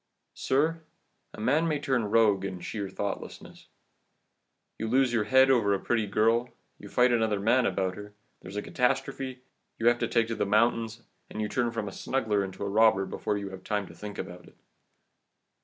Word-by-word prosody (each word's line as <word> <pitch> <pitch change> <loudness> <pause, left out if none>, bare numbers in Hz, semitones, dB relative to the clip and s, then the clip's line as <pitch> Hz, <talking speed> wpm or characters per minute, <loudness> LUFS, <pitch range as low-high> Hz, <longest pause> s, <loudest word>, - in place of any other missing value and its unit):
"Sir, 160 +5 0 0.5
a - - -12
man 145 +9 +2
may 155 -2 0
turn 130 -5 0
rogue 105 -3 +3
in 95 -2 -4
sheer 100 +2 -5
thoughtlessness. 100 +1 -6 1.1
You 110 - -2
lose 130 +1 +2
your 110 -3 +1
head 130 +4 +5
over 105 -6 +3
a - - -3
pretty 110 -1 0
girl, 115 +4 +2 0.3
you - - -11
fight 125 0 +3
another 110 -3 +1
man 120 +5 +3
about 95 -1 -1
her, 105 0 -10 0.3
there - - -10
is 95 - -9
a 105 - -2
catastrophe, 130 0 -1 0.3
you 115 - -4
have 120 0 +1
to - - 0
take 115 -1 +2
to 115 - -2
the - - 0
mountains, 115 +2 +1 0.3
and - - -7
you 105 - 0
turn 120 +2 0
from 115 -3 -4
a - - -5
smuggler 105 -3 -1
into 95 +1 -6
a - - -2
robber 105 -1 +4
before 105 +2 -3
you 100 -1 -5
have 95 -1 -10
time 105 0 -1
to - - -12
think 105 +4 -8
about 90 -1 -7
it. - - -19
110 Hz, 195 wpm, -28 LUFS, 100-125 Hz, 1.1 s, head